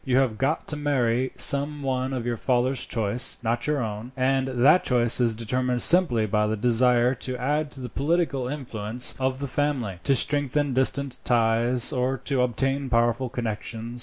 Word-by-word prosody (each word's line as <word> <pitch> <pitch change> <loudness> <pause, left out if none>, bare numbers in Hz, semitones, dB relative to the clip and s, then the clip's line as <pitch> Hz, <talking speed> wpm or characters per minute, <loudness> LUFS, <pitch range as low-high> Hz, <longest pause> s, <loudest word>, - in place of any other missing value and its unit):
You 130 -1 0
have 125 -5 0
got 145 +4 -2
to 150 - -2
marry 130 -4 -1
some 145 +1 +3
one 130 -1 -2
of 125 -3 -4
your 120 -1 -2
father's 125 +2 -1
choice, 115 +2 +2
not 120 +2 -2
your 150 -4 -1
own, 110 +3 -7
and 130 +1 0
that 135 +7 +3
choice 120 -1 +2
is 115 -2 +2
determined 125 +2 0
simply 160 -11 +4
by 105 0 0
the 110 +1 -2
desire 125 +2 +2
to 130 0 -6
add 145 +4 -2
to 140 - -12
the 125 - -6
political 145 -2 -2
influence 125 -4 -1
of 130 0 -1
the 140 - -5
family, 130 -9 -3
to 135 - +3
strengthen 145 +1 +1
distant 130 +1 0
ties, 120 +2 +3
or 130 +1 -1
to 135 0 -2
obtain 135 +3 -2
powerful 120 +1 0
connections. 115 0 -6
125 Hz, 175 wpm, -24 LUFS, 120-135 Hz, -, simply